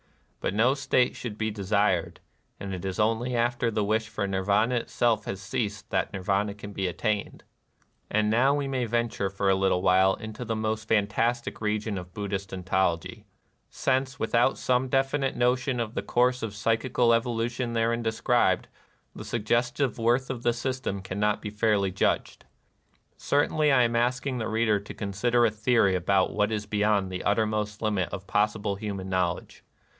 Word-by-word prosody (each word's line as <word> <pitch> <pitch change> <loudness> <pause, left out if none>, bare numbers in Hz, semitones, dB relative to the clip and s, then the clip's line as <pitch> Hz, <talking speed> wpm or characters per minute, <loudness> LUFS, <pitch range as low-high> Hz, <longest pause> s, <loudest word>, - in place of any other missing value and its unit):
But 95 - -2
no 120 +5 +4
state 130 -2 +1
should 110 -4 -6
be 110 0 -1
desired; 100 -3 0 0.4
and 100 -1 -5
it 90 - -5
is 95 0 -4
only 115 +3 +1
after 120 0 +1
the 110 -1 -1
wish 110 +2 0
for 110 -2 -2
Nir 95 -1 -1
vana 105 +5 +2
itself 115 -2 0
has 95 - -4
ceased 105 +2 -4
that - - 0
Nirvana 100 +1 -1
can 105 0 -9
be 95 -1 -1
attained. 100 +4 -2 0.7
And 110 0 +1
now 130 +5 +4
we 145 -1 -1
may 130 -2 -1
venture 115 -3 -1
for 100 +1 -2
a - - +4
little 95 -1 +1
while 95 +1 +4
into 110 +3 -7
the 115 -1 -2
most 110 0 -2
fantastic 110 +4 0
region 105 -1 -1
of 90 0 -12
Buddhist 100 -1 -4
ontology, 95 -2 -1 0.2
— - - -45
since, 130 0 -1
without 120 +3 +2
some 125 +1 +1
definite 135 +1 +1
notion 125 +1 +1
of 115 -1 -3
the - - -2
course 125 +1 +1
of 105 -3 -4
psychical 115 +2 +2
evolution 120 +1 -1
therein 115 +1 +1
described, 115 +2 +1 0.5
the - - -7
suggestive 120 +3 0
worth 120 +4 +1
of 125 -3 -5
the 120 0 +2
system 120 -5 -3
cannot 100 +2 -1
be 105 - -4
fairly 105 -3 +1
judged. 95 - -1 0.7
Certainly 150 +1 +2
I 125 -2 +5
am 115 0 0
ask 120 +3 +1
ing 130 -3 -2
the 110 - -2
reader 110 -1 +2
to 100 - -9
consider 120 +4 +1
a 110 - +2
theory 110 -2 +2
about 95 +1 +1
what 105 +1 +1
is 105 -1 -2
beyond 105 -2 +1
the 90 - -4
uttermost 105 0 0
limit 105 -5 0
of 95 - -7
possible 105 -1 0
hu 105 -1 -4
man 95 -1 -6
knowledge. 90 -2 -2
110 Hz, 175 wpm, -27 LUFS, 100-120 Hz, 0.7 s, I